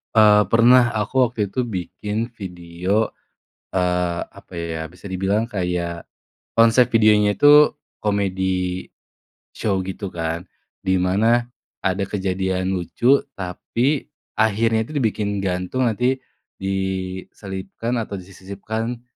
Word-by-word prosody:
Eee, 105 -2 +6
pernah, 120 +2 +5
aku 125 +4 +2
waktu 120 -1 -14
itu 125 +3 -1
bikin 105 +3 -4
video, 90 0 -2 0.6
eee, 90 -2 +1 0.2
apa - - -15
ya, 80 -1 -4
bisa 90 +4 -12
dibilang 100 +5 0
kayak, 90 -3 -2 0.5
konsep 115 +2 +5
videonya 105 -2 +5
itu 145 +7 +7 0.2
comedy 95 -3 -1 0.7
show 95 -3 0
gitu 95 +2 -5
kan, 85 +1 -3 0.4
di 95 0 +3
mana 115 +6 +2 0.3
ada 95 +1 0
kejadian 95 -1 -1
lucu 120 +10 +2 0.2
tapi 115 +9 -1 0.3
akhirnya 110 +1 +2
tuh 155 - -10
dibikin 105 -3 -1
gantung, 95 +7 -1
nanti 125 +4 0 0.4
diselipkan 95 +3 -3
atau 105 -3 -3
disisipkan 100 +5 -5
100 Hz, 105 wpm, -22 LUFS, 90-115 Hz, 0.7 s, itu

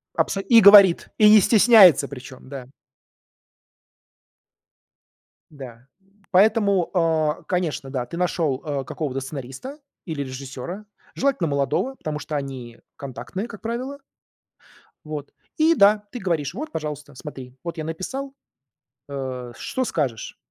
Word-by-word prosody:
Абсо 195 - 0
и 230 -2 +8
говорит, 200 -3 +8
и 210 -1 +6
не 215 0 +8
стесняется 205 - +6
причем, 130 -1 -11
да. 135 -3 -8 2.8
Да. 130 -4 -12 0.4
Поэтому, 200 -2 +3
а, 160 -3 0
конечно, 165 -7 -2
да, 130 -2 -3
ты 170 - -8
нашел, 165 -6 -1
э, 145 -3 -3
какого-то 135 -1 -4
сценариста 135 - -8 0.3
или 155 -5 -4
режиссера, 135 +8 -8 0.3
желательно 270 -11 0
молодого, 140 - -1
потому 150 - -5
что 155 - -6
они 130 -4 -6 0.2
контактные, 140 - -6
как 215 -3 -11
правило. 250 +5 -5 1.1
Вот. 150 -2 -7 0.3
И 320 +2 +4
да, 205 -1 +4
ты 245 - -6
говоришь: 165 -8 -2
"Вот, 305 +5 -6
пожалуйста, 150 -2 -6
смотри, 130 -2 -10
вот 170 0 -6
я 155 - -4
написал. 260 - -5 0.8
А, 130 -3 -6
что 260 - -3
скажешь?" 135 - -3
155 Hz, 125 wpm, -23 LUFS, 135-205 Hz, 2.8 s, и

